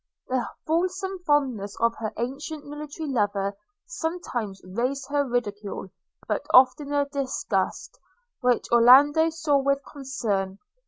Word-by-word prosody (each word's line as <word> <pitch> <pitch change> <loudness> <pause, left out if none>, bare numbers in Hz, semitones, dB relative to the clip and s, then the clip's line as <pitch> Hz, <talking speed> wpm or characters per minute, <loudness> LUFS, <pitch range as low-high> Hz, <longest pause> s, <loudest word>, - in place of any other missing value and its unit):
The 255 -2 -1 0.2
fulsome 370 +4 -1
fondness 255 -9 +1
of 230 0 +3
her 220 -1 -3
ancient 280 +5 -4
military 295 +2 -7
lover 205 -6 0 0.3
sometimes 320 - -4
raised 250 +9 -2
her 290 0 +2
ridicule, 205 -5 -3 0.4
but - - -1
oftener 285 +2 +5
disgust, 280 -2 -2 0.4
which 250 -1 +1
Orlando 275 +7 +7
saw 315 -3 +1
with 275 0 0
concern. 215 -9 -3
270 Hz, 110 wpm, -25 LUFS, 230-295 Hz, 0.4 s, Orlando